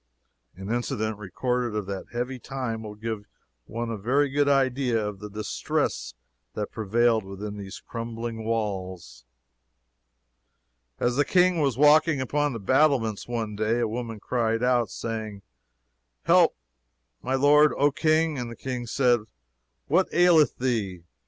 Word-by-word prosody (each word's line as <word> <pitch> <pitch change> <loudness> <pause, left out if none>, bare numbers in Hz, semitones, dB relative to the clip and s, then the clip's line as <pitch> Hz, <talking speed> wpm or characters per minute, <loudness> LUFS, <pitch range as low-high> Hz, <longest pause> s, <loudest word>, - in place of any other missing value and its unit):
An 95 +4 -6
incident 110 -3 -2
recorded 120 +3 -2
of 105 - -3
that 95 -1 -5
heavy 125 +2 -3
time 125 -4 -4
will 105 -1 -8
give 110 -1 -5 0.4
one 115 +1 -4
a 110 - -3
very 135 +8 +1
good 145 0 +2
idea 135 -3 +2
of 105 -2 -6
the 105 - -8
distress 65 - -2 0.4
that 105 - -3
prevailed 115 +1 +1
within 100 +2 -7
these 100 -1 -8
crumbling 115 -1 -5
walls. 95 - -4 1.7
As 120 +1 0
the 145 - +4
King 180 +1 +3
was 135 -5 +1
walking 150 +1 +5
upon 145 +2 0
the 115 - -5
battlements 130 -2 +2
one 115 -3 -3
day, 110 +3 0
"a 120 - +1
woman 115 -1 -5
cried 115 +1 -1
out, 125 -2 +2
saying, 110 -3 -5 0.8
Help, - - +5 0.7
my 130 +1 -1
lord, 145 +2 +5
O 145 +1 +3
King! 155 0 +1
And 120 -1 -4
the 115 - -8
King 125 -2 -5
said, 125 0 +3 0.7
What 180 +6 +2
aileth 175 -3 +4
thee? 105 -9 -2
115 Hz, 140 wpm, -26 LUFS, 105-135 Hz, 1.7 s, walking